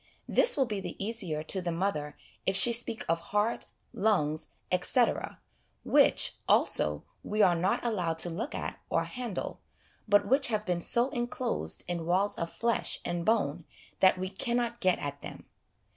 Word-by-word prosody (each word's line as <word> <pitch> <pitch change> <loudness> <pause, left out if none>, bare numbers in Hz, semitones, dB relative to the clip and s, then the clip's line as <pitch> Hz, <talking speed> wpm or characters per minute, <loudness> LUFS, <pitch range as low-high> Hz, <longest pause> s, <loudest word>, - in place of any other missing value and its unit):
This - - +2
will 270 - +3
be 210 -4 -3
the 190 - -6
easier 195 -8 -2
to 190 +4 -1
the 175 -1 -2
mother 165 -4 -2 0.3
if 190 - +3
she 235 +5 +7
speak 230 -1 0
of 165 0 +1
heart, 210 +6 -1 0.3
lungs, 155 -7 0 0.2
etc., - - +1 0.4
which, - - +4
also, 75 -1 +3 0.2
we 210 0 +1
are 180 - +5
not 180 +7 0
allowed 180 -8 -1
to 175 - +4
look 230 - -4
at - - -5
or - - +1
handle, 245 -6 -5 0.5
but 205 0 +4
which 270 +3 +4
have 215 -2 -1
been 175 -1 -1
so 240 +8 +2
enclosed 245 0 -3
in 170 -2 -4
walls 190 +4 +1
of 170 - -4
flesh 235 -1 -1
and 175 -1 -3
bone 175 -8 +1 0.4
that 185 -1 +5
we 185 +1 -3
cannot 235 +4 -2
get 185 -1 +2
at 145 0 -6
them. - - -9
195 Hz, 165 wpm, -29 LUFS, 170-230 Hz, 0.5 s, she